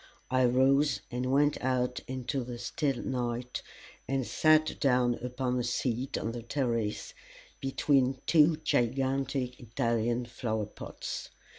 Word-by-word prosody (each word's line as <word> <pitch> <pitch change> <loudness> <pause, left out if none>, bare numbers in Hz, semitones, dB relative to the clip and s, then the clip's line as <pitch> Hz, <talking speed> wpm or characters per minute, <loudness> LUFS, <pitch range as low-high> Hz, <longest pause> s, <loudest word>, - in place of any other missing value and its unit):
I 130 0 +4
rose 130 -1 +3
and 125 +1 -2
went 145 +2 +3
out 125 -1 0
into 130 +1 -2
the 120 0 -6
still 135 +1 -2
night, 125 -1 -2 0.5
and 135 -1 0
sat 155 +3 +3
down 125 -3 +3
upon 125 0 -1
a - - 0
seat 125 +1 -1
on 115 - -2
the 120 0 -5
terrace, 115 -4 -2 0.5
between 135 -1 +2
two 160 -1 +5
gigantic 130 +1 0
Italian 115 +1 0
flower 115 -3 -2
pots. 105 - -7
125 Hz, 125 wpm, -30 LUFS, 120-135 Hz, 0.5 s, two